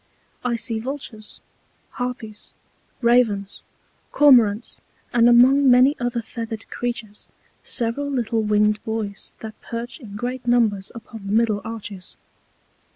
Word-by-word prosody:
I 245 -1 0
see 230 0 -2
Vultures, 235 -4 -7 0.6
Harpyes, 240 -4 -6 0.5
Ravens, 225 -5 +2 0.5
Cormorants, 240 -7 +4 0.3
and 240 0 +5
among 260 +3 +6
many 255 +4 +6
other 240 -1 -2
feather'd 225 -1 -6
Creatures 235 -4 -5 0.4
several 240 +5 -2
little 235 -4 0
winged 210 0 +2
Boys, 220 -3 -4
that 220 -1 -9
perch 235 +5 -6
in 210 -7 -10
great 245 +3 -4
Numbers 220 -5 +2
upon 225 -3 -10
the - - -3
middle 215 -2 +2
Arches. 205 -4 -8
230 Hz, 115 wpm, -22 LUFS, 215-245 Hz, 0.6 s, among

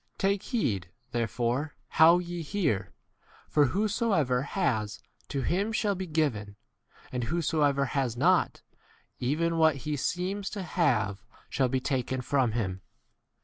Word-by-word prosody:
Take 195 0 +1
heed 105 - -1 0.2
therefore 120 +5 -1
how 165 +2 +7
ye 175 -1 -4
hear; 145 - -1 0.6
for 150 -1 +4
whosoever 195 - +1
has, 110 - -1 0.3
to 140 -2 -2
him 200 - 0
shall 215 -2 +1
be 190 -1 -5
given, 130 -11 -1 0.6
and 125 -2 -2
whosoever 145 -2 +1
has 130 -4 -1
not, - - +2 0.6
even 165 +6 0
what 160 -2 +5
he 150 -1 -1
seems 185 +7 -2
to 195 - -3
have 110 - 0 0.3
shall 130 -2 +1
be 130 +1 +1
taken 130 -1 -1
from 130 -3 +1
him. 95 -5 -2
145 Hz, 130 wpm, -29 LUFS, 120-175 Hz, 0.6 s, how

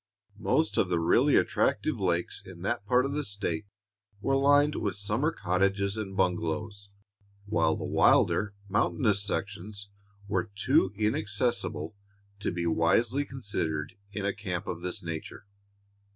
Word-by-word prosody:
Most 145 +8 +1
of 95 - +2
the 85 -2 +1
really 85 - +4
attractive 115 +4 +1
lakes 90 -2 0
in - - -11
that 100 - -2
part 125 +3 +4
of 135 - -2
the 150 +1 -1
State 100 - -3 0.5
were 135 +7 +1
lined 145 +2 +4
with 100 - -2
summer 105 +10 0
cottages 100 - 0
and 100 -3 -5
bungalows, 95 +3 -1 0.6
while 85 -7 +2
the - - -5
wilder, 100 -1 +3
mountainous 105 +1 +2
sections 100 0 -4 0.4
were 105 +1 -1
too 95 -1 +3
inaccessible 105 -4 -1 0.4
to 105 - -1
be 85 -1 -2
wisely 115 - +2
considered 85 - -3 0.2
in 100 -1 -4
a 100 - +1
camp 95 -2 -4
of 85 -1 -5
this 90 0 -3
nature. 85 +3 -6
100 Hz, 135 wpm, -29 LUFS, 90-110 Hz, 0.6 s, really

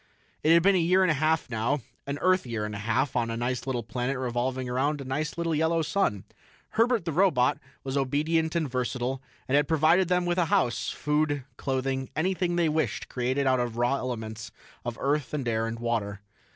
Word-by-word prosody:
It 155 - +3
had 170 0 +5
been 200 +1 +5
a 185 - +3
year 180 +3 +4
and 185 - +3
a - - +3
half 155 +2 +1
now 125 +4 -1 0.3
an 140 +1 -2
Earth 185 0 +4
year 115 -3 -2
and 105 - -5
a 105 - -5
half 120 +6 0
on 120 -2 +1
a 115 - -3
nice 125 +2 -2
little 125 -3 -1
planet 125 +4 -2
revolving 125 +1 -2
around 140 +4 0
a 135 - -6
nice 150 +5 -3
little 170 -1 0
yellow 160 +1 +2
sun. 150 - 0 0.5
Herbert, 230 -4 +2
the 165 - -1
robot, 145 -5 +3 0.2
was 135 0 -3
obedient 155 +4 +1
and 165 -3 +1
versatile 125 0 -2 0.3
and 130 - +1
had 145 0 +3
provided 165 +4 +4
them 180 0 +1
with 175 +1 +1
a 175 - +3
house, 185 -11 +1
food, 150 -1 0
clothing, 130 0 -2
anything 180 +1 0
they 170 -1 +2
wished 155 +1 -1
created 130 +3 0
out 130 -1 +3
of 120 -2 -1
the - - -5
raw 120 +3 +2
elements 110 -4 -5 0.3
of 120 -1 -4
earth 145 0 0
and 135 -4 -3
air 115 -1 0
and 115 +1 -4
water. 110 -4 -2
135 Hz, 210 wpm, -27 LUFS, 125-160 Hz, 0.5 s, had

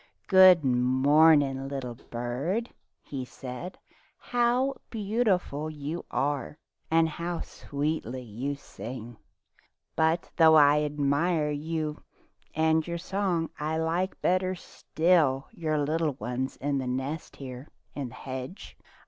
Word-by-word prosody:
"Good 185 -4 +7
morning, 135 +2 +4
little 135 -3 -4
bird," 130 - -3 0.3
he 135 -3 -5
said. 130 +8 -8 0.4
"How 245 +3 +1 0.2
beautiful 200 -9 0
you 155 +2 -5
are, 145 +1 -2 0.3
and 165 0 +4
how 170 +2 -4
sweetly 140 -4 -4
you 125 +6 -4
sing! 120 -4 -9 0.8
But 160 +1 +1
though 160 -1 +7
I 150 0 +6
admire 150 +2 +1
you 155 +1 -3 0.5
and 160 +1 +2
your 170 0 -2
song, 180 -2 -1
I 155 +1 -1
like 170 +4 -1
better 185 +1 +1
still 160 -5 +1
your 155 -2 -2
young 155 -1 0
ones 125 +4 -3
in 140 0 -1
the 130 - -3
nest 135 +5 -4
here 130 0 -8 0.3
in 140 -3 -4
the 125 - -13
hedge. 130 +7 -7
150 Hz, 115 wpm, -28 LUFS, 135-170 Hz, 0.8 s, Good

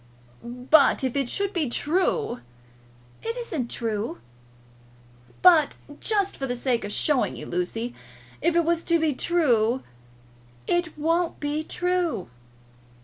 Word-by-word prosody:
"But 255 +4 +3
if 260 -1 -1
it 275 -3 0
should 400 +6 -1
be 315 -7 0
true 350 - 0 0.4
?" 120 0 -28
"It 460 +2 -4
isn't 325 - -3
true." 225 -1 -3 1.3
"But 325 -5 +6 0.2
just 405 -3 0
for 270 - -3
the 245 - -2
sake 245 -1 0
of 205 - -5
showing 290 +4 +1
you, - - -7
Lucy; 225 +7 -3 0.5
if 335 +2 +2
it 340 -1 +3
was 335 0 +1
to 335 -1 +3
be 315 -2 +1
true." 255 -7 +2 0.8
"It 345 -3 0
won't 330 +3 0
be 295 +1 -1
true." 350 - -1
295 Hz, 135 wpm, -25 LUFS, 240-340 Hz, 1.3 s, But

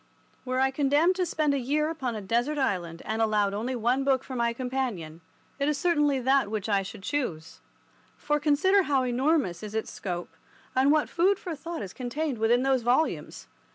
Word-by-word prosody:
Were 255 0 -1
I 265 0 +3
condemned 290 +6 +3
to 365 -1 0
spend 305 -3 +1
a 280 - 0
year 295 +4 0
upon 260 -7 -3
a 215 - -4
desert 240 +9 0
island 180 - -2
and 220 +2 -2
allowed 210 -2 +2
only 235 +5 -2
one 245 +3 +1
book 270 -1 +2
for 260 - -7
my 235 -1 +1
companion, 235 -11 -4 0.4
it 280 +1 +1
is 300 - 0
certainly 295 -3 +2
that 265 -3 +2
which 215 -2 -3
I 200 -2 +2
should 190 0 -9
choose. 185 - -3 0.6
For 295 0 0
consider 315 +7 +3
how 280 -7 +1
enormous 255 - +1
is 215 0 -7
its 220 - -2
scope, 175 -2 -5 0.4
and 265 +2 +4
what 305 -1 +3
food 370 +3 +2
for 350 -4 -5
thought 335 -3 -6
is 190 - -8
contained 265 +1 -3
within 235 +3 +3
those 265 -2 +2
volumes. 250 +7 0
260 Hz, 190 wpm, -27 LUFS, 220-295 Hz, 0.6 s, and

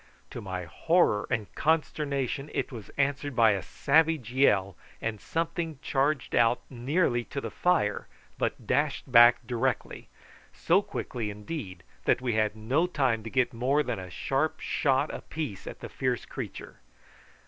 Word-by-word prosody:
To - - -6
my 95 -2 -4
horror 110 - +2
and 115 -5 -2
consternation 145 -3 0
it - - -1
was 115 -5 -9
answered 140 0 0
by 115 -2 +6
a 100 -2 0
savage 155 - +2
yell, 100 - +3 0.2
and 110 -2 -3
something 165 -1 -2
charged 140 0 0
out 120 +1 +3
nearly 125 0 +1
to 140 - -5
the - - -5
fire 170 -13 +1 0.3
but - - -2
dashed 145 -1 0
back 120 0 +7
directly, 125 +2 -2 0.5
so - - +3
quickly, 115 -4 -4
indeed, 105 - -6 0.2
that - - +3
we 125 -2 -1
had 110 0 +1
no 130 +11 +1
time 135 -9 +1
to 115 - -6
get 130 +1 +1
more 135 +6 +2
than 125 -7 -3
a 90 -1 -7
sharp 135 - -1
shot 135 +1 +1
apiece 150 -12 -5
at - - -8
the - - -5
fierce 125 -2 -2
creature. - - -7
130 Hz, 150 wpm, -28 LUFS, 110-145 Hz, 0.5 s, back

